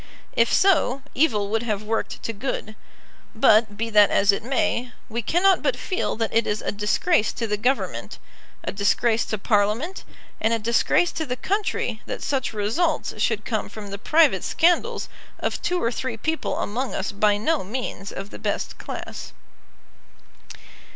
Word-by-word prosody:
If 230 0 +3
so, 295 -8 +3
evil 220 -9 +2
would 225 0 +1
have 215 -3 -2
worked 225 +1 -3
to 230 - -3
good. 215 -1 -4 0.6
But, 220 -1 +4
be 230 +1 -2
that 210 -1 +6
as 200 +1 +4
it 200 - -2
may, 245 -1 0 0.2
we 235 +1 -2
cannot 365 - +3
but - - 0
feel 370 - -2
that 225 0 -2
it 230 0 +2
is 210 0 -1
a - - -1
disgrace 210 - +1
to 230 - -3
the 210 -1 0
Government, 250 +6 -1 0.5
a - - -2
disgrace 220 +3 +2
to 215 - -2
Parliament, 215 - 0 0.4
and 225 +1 +2
a - - 0
disgrace 235 +10 +2
to 320 - -3
the 250 - -1
country 370 - -2
that - - -5
such 270 -3 -1
results 225 - 0
should 215 -1 0
come 215 -3 -2
from 205 -1 -9
the 200 - -5
private 300 - +4
scandals 345 +1 +2 0.3
of - - -2
two 360 0 0
or 230 - 0
three 255 -1 -3
people 315 +8 -2
among 250 +5 -2
us 190 - -2
by 205 0 +2
no 305 +7 0
means 205 -2 -5
of 195 +1 -7
the - - -9
best - - -3
class. - - -7
225 Hz, 170 wpm, -24 LUFS, 210-270 Hz, 0.6 s, that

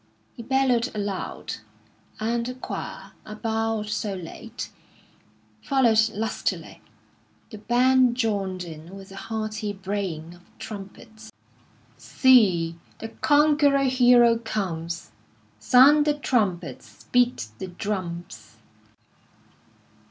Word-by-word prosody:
He - - -9
bellowed 255 -1 +1
aloud, 200 -2 -4 0.6
and 235 +2 0
the 250 +1 -5
choir, 255 - -7
a 215 - -9
bar 225 0 -1
or 215 - -3
so 210 -1 -3
late, 175 -3 -8 0.9
followed 240 -5 +3
lustily. 220 +2 -3 0.7
The 215 - -9
band 250 +2 +3
joined 200 -6 -1
in 165 +2 -10
with 195 0 -12
a - - -10
hearty 215 0 -4
braying 190 -5 -4
of 175 - -17 0.2
trumpets. 220 +2 -10 0.7
"See, 185 -11 +3 0.2
the 225 - -7
conquering 290 -1 +3
Hero 245 -2 +5
comes, 170 - -4 0.5
_Sound 285 +4 +6
the 295 -1 +2
trumpets; 205 - -2
beat 245 - +2
the 190 - -5
drums. 175 - -6
215 Hz, 100 wpm, -25 LUFS, 190-245 Hz, 0.9 s, Sound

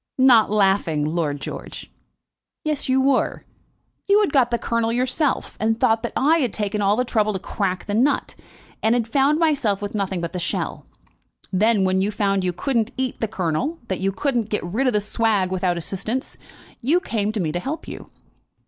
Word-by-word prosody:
"Not 255 -4 +6
laughing, 195 -7 +2
Lord 155 -2 -1
George." - - -8 0.7
"Yes, 305 -3 -2
you 260 +1 +3
were. 265 0 +1 0.6
You 405 +1 +5
had 400 - 0
got 260 -4 +4
the 235 - 0
kernel 230 -1 -1
yourself, 255 +4 0
and 225 +1 0
thought 225 0 +3
that 235 - -4
I 310 +5 +4
had 250 -7 0
taken 210 0 -2
all 200 +1 +3
the 250 +2 0
trouble 215 -3 +1
to - - -1
crack 185 -1 -3
the 205 - -3
nut 260 +7 +1 0.5
and 225 +2 +3
had 235 -2 0
found 280 +4 +2
myself 280 -11 +1
with 205 -1 -5
nothing 195 -3 -2
but 170 -1 -4
the 180 - -3
shell. 170 - -3 0.7
Then, 210 +1 +3
when 190 0 +2
you 200 - +1
found 200 -2 0
you 180 - +1
couldn't 225 +5 0
eat 260 -1 -3
the 225 - +1
kernel, 195 - -2
that 190 - -2
you 195 +1 0
couldn't 235 0 -1
get 210 - -1
rid 215 +10 -1
of 250 - +2
the 210 - +2
swag 210 -3 0
without 180 -2 0
assistance, 195 - -3 0.5
you 300 +9 +3
came 215 - -2
to 215 - -3
me 160 -5 -1
to 175 - -2
help 280 - -5
you. - - -9
215 Hz, 195 wpm, -22 LUFS, 190-255 Hz, 0.7 s, Not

